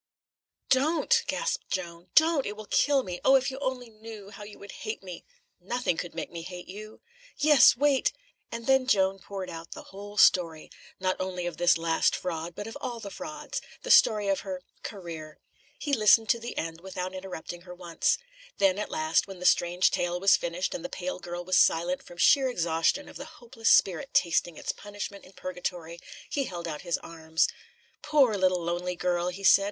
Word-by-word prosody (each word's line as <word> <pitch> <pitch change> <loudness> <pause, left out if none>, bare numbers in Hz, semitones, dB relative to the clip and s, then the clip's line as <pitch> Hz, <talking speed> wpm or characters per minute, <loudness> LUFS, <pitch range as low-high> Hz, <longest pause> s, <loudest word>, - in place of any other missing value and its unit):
"Don't!" 315 - +3
gasped - - -2
Joan. 175 -1 -5
"Don't! 315 -3 +4
it 205 +1 -5
will 215 - -8
kill 280 +4 +2
me. 180 -4 -6
Oh, 270 - +6
if 265 0 +2
you 265 - -7
only 260 -3 -3
knew, 215 -2 -11
how 210 - -11
you 205 0 -10
would 200 - -11
hate 215 -2 -5
me!" 180 -2 -8 0.4
"Nothing 220 +1 -1
could 175 +1 -6
make - - -5
me 170 - -6
hate 180 +1 -8
you." 215 +3 -10 0.4
"Yes. 290 -5 +6
Wait!" 280 -1 +3 0.4
And 230 0 -6
then 265 0 +3
Joan 195 -4 +2
poured 195 0 -6
out 165 0 -8
the - - -10
whole 205 +1 -9
story 165 -5 +3 0.3
not 185 0 0
only 185 -1 -3
of 175 -2 -4
this 175 0 +4
last 165 0 +1
fraud, 170 -1 -4
but 205 - -6
of 225 - -8
all 240 -2 -4
the 200 -3 -8
frauds; 300 +1 -6 0.2
the - - -1
story 210 -2 +6
of 195 -1 +1
her 185 -2 -6 0.2
"career." 165 -6 -8 0.4
He 290 - -4
listened 220 -1 +5
to 235 - +3
the 235 +1 -7
end, 165 0 -4
without 185 0 -5
interrupting 185 -2 -7
her 180 0 -11
once. 175 -2 0 0.4
Then, 195 0 +3
at 210 - -3
last, 155 +4 +1
when 195 -1 -9
the 180 - -7
strange 180 0 +3
tale 175 0 -1
was 195 0 +6
finished, 170 +2 -2
and 170 - -5
the - - -4
pale 185 0 -4
girl 175 0 -6
was 185 0 +3
silent 175 +2 +2
from 175 - -14
sheer 270 +9 +5
exhaustion 170 - 0
of - - -10
the 280 - -7
hopeless 235 -2 -2
spirit 180 -4 +3
tasting 170 -1 +2
its - - -3
punishment 205 -1 -8
in 185 - -17
purgatory, 175 -2 -5 0.3
he 280 -2 -1
held 175 -4 -6
out 150 -2 -5
his 175 -2 -1
arms. 160 0 0 0.5
"Poor, 270 -8 +3
little, 185 -2 +1
lonely 175 +1 -2
girl!" 175 0 0
he 185 +2 -5
said. 195 - +7
190 Hz, 195 wpm, -28 LUFS, 175-225 Hz, 0.5 s, said